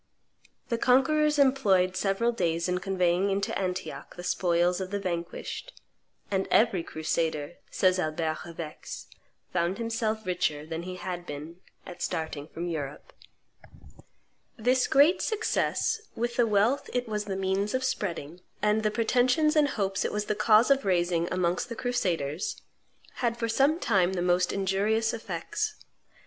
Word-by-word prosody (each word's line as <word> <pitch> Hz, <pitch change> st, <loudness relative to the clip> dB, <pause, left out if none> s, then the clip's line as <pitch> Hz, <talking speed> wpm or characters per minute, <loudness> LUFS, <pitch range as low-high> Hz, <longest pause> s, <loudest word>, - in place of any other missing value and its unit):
The 235 Hz, -2 st, 0 dB
conquerors 300 Hz, +5 st, +3 dB
employed 205 Hz, -10 st, +3 dB
several 200 Hz, +5 st, +1 dB
days 170 Hz, -7 st, 0 dB
in 180 Hz, 0 st, 0 dB
conveying 185 Hz, 0 st, +1 dB
into 195 Hz, 0 st, -1 dB
Antioch 185 Hz, -1 st, -4 dB
the 175 Hz, -, -8 dB
spoils 175 Hz, 0 st, +1 dB
of 185 Hz, -, -4 dB
the 205 Hz, -, -2 dB
vanquished; 180 Hz, -, -5 dB, 0.5 s
and 195 Hz, -1 st, 0 dB
"every 210 Hz, -5 st, +4 dB
crusader," 160 Hz, 0 st, -2 dB
says 185 Hz, -1 st, +2 dB
Albert 155 Hz, -1 st, -1 dB
of 170 Hz, -1 st, -11 dB
Aix, 155 Hz, -2 st, -7 dB, 0.5 s
"found 175 Hz, +1 st, 0 dB
himself 225 Hz, -1 st, -2 dB
richer 155 Hz, -5 st, -1 dB
than 160 Hz, +1 st, -4 dB
he 180 Hz, +1 st, -6 dB
had 175 Hz, -1 st, -5 dB
been 150 Hz, +4 st, -7 dB, 0.3 s
at 180 Hz, -, -10 dB
starting 160 Hz, -2 st, -3 dB
from 170 Hz, +1 st, -6 dB
Europe." 150 Hz, -4 st, -5 dB, 1.4 s
This 250 Hz, +3 st, +2 dB
great 290 Hz, +7 st, +5 dB
success, 445 Hz, 0 st, 0 dB
with 240 Hz, +1 st, -2 dB
the 240 Hz, -2 st, +3 dB
wealth 215 Hz, +6 st, +2 dB
it 245 Hz, -1 st, -1 dB
was 210 Hz, -1 st, -2 dB
the 195 Hz, -2 st, -3 dB
means 195 Hz, +3 st, 0 dB
of 260 Hz, -, 0 dB
spreading, 175 Hz, -, -3 dB, 0.2 s
and 210 Hz, +1 st, +2 dB
the 215 Hz, -, +2 dB
pretensions 250 Hz, +8 st, +2 dB
and 300 Hz, -1 st, +5 dB
hopes 195 Hz, -7 st, -1 dB
it -, -, -1 dB
was 210 Hz, 0 st, -2 dB
the 210 Hz, -, 0 dB
cause 220 Hz, +4 st, +4 dB
of 275 Hz, 0 st, +4 dB
raising 175 Hz, -2 st, +1 dB
amongst 180 Hz, +5 st, 0 dB
the 235 Hz, -, -5 dB
crusaders, 180 Hz, -, -1 dB, 0.6 s
had 235 Hz, -2 st, 0 dB
for 230 Hz, -1 st, -1 dB
some 275 Hz, +8 st, +3 dB
time 190 Hz, -, +2 dB
the 175 Hz, -2 st, -1 dB
most 180 Hz, 0 st, +2 dB
injurious 205 Hz, +4 st, +1 dB
effects. 225 Hz, -, -3 dB
195 Hz, 150 wpm, -28 LUFS, 175-230 Hz, 1.4 s, great